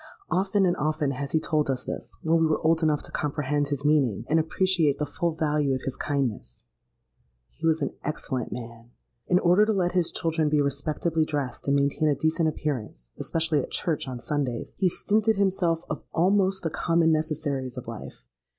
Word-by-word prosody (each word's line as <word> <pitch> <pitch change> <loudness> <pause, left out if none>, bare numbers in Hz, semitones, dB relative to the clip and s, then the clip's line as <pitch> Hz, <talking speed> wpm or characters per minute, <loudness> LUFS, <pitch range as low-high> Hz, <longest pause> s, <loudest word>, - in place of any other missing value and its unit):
Often 195 +2 +2
and 175 -1 +2
often 155 -1 0
has 140 +1 -4
he 160 - +3
told 155 -2 0
us 130 -1 -1
this, - - -6
when 165 +1 +3
we 160 - +3
were 155 - +1
old 160 +1 +3
enough 155 -2 +1
to - - -6
comprehend 145 0 -1
his 140 0 -3
meaning, 130 -8 +2
and 160 - +4
appreciate 160 -2 +2
the 150 - -1
full 170 +1 -2
value 150 -4 +1
of 130 - -5
his 135 - -3
kindness. 120 - -3 0.9
He 165 +3 -3
was 160 0 +2
an - - -2
excellent 130 -5 -3
man. 115 -1 -8 0.4
In 180 - +4
order 180 +3 +5
to 215 +1 +2
let 180 -3 +1
his 180 -2 +1
children 160 -2 0
be 150 0 +2
respectably 150 +3 0
dressed 145 -6 -3
and 140 - +3
maintain 140 +2 +2
a 145 - +2
decent 160 +1 +1
appearance—especially 145 - -2
at - - -7
church 160 -5 -1
on 125 -2 -5
Sundays—he 145 +7 -1
stinted 215 +5 +1
himself 180 -4 +1
of - - -4
almost 190 +2 +2
the 165 - -1
common 165 0 +2
necessaries 150 -5 -1
of - - -7
life. - - -8
155 Hz, 185 wpm, -26 LUFS, 140-165 Hz, 0.9 s, order